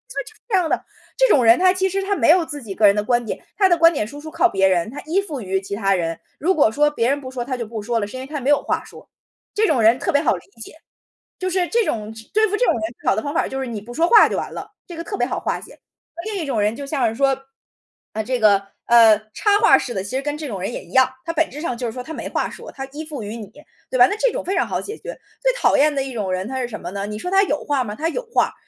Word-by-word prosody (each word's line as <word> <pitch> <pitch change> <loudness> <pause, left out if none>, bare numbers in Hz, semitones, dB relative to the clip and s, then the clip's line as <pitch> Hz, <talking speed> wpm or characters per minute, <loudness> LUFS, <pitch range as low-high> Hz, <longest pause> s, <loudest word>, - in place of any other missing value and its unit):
就 - - -1 0.2
是 - - -28
这 425 - +2
样 355 -3 +1
的。” - - 0 0.3
这 - - +5
种 270 - +5
人 230 +1 +7
他 370 0 +5
其 380 0 +1
实 390 +1 -2
他 400 +1 0
没 - - +2
有 340 +1 +5
自 295 -2 -7
己 205 -4 -6
个 215 - +3
人 200 - +4
的 210 - 0
观 240 +2 +1
点， - - -5
他 385 -2 +4
的 345 - +4
观 330 0 +6
点 245 - -1
输 285 +6 -10
出 315 - -8
靠 - - +3
别 195 0 +2
人， 180 0 +1
他 280 - -7
依 345 +6 +1
附 305 -10 -6
于 190 -1 -1
其 195 +1 -5
他 195 -1 +1
人， 165 -2 -2 0.2
如 360 +6 +2
果 285 -8 +4
说 295 +5 +2
别 235 -4 0
人 280 +1 +1
不 255 -1 -8
说 250 -2 -4
他 255 0 -3
就 235 - -4
不 220 -1 -6
说 230 +2 -1
了， 205 - -1
是 230 - -8
因 - - -6
为 260 - -8
他 295 0 -4
没 260 - -1
有 290 - +4
话 - - -1
说。 - - -14 0.5
这 435 +1 +3
种 265 - +2
人 225 +3 +5
特 - - -1
别 285 -3 +3
好 260 -9 +2
理 175 - -9 0.2
解， - - -9 0.7
就 370 - -1
是 370 -1 +1
这 465 +2 +1
种 215 -2 -3
只 220 0 -13
对 435 +1 +4
付 420 +1 -1
这 - - +2
种 - - +3
人 225 - -3 0.2
最 - - -1
好 - - +3
的 220 - -1
方 285 +3 -4
法 - - +1
就 265 - -4
是 265 - -3
你 230 -3 -5
不 240 +3 -10
说 330 +6 +2
话 445 +2 +7
就 - - -3
完 - - -4
了， - - -8 0.2
这 345 - -9
个 335 - -4
特 400 - -5
别 - - +1
好 - - -3
化 - - -2
解。 - - -14 0.5
另 425 -2 -3
一 - - -4
种 270 -6 -1
人 210 +2 +1
就 280 - -6
像 275 -4 0
是 220 - -6
说， 270 +1 +1 0.7
呃， 220 - -2
这 250 +3 -1
个， 200 -2 +4 0.2
呃， 230 -2 +7 0.2
插 410 -1 +3
话 450 - +7
式 245 - -4
的 190 -3 -3
其 195 - -7
实 265 - 0
跟 295 +1 -3
这 310 - -6
种 200 -7 -5
人 195 - -3
也 - - -6
一 - - -18
样， 260 -1 +5 0.2
他 330 - -1
本 325 0 +1
质 295 - -8
上 250 -7 -3
就 245 -1 -3
是 225 - -5
说 250 - -6
他 320 - -8
没 - - -5
话 - - -1
说， - - -10
他 270 - -6
依 305 +3 -7
附 295 -7 -6
于 210 +3 -6
你， 215 - -8 0.4
对 255 - -1
吧？ 245 0 +8
那 410 - -2
这 - - +2
种 - - -3
非 385 - -2
常 - - +1
好 - - -2
解 430 +2 -7
决。 - - -8 0.2
最 - - +2
讨 - - +3
厌 295 +2 +4
的 270 - 0
一 270 - -6
种 210 -5 -3
人 185 +1 -2
他 265 0 -3
是 250 - -2
什 220 -3 -6
么 - - -6
呢？ 200 +1 -4
你 210 0 -5
说 360 +12 -5
他 390 0 +5
有 295 -6 -1
话 285 -3 0
吗？ 210 -1 -5
他 320 +7 -1
有 - - -3
话， - - +2
265 Hz, 350 characters per minute, -21 LUFS, 220-330 Hz, 0.7 s, 吧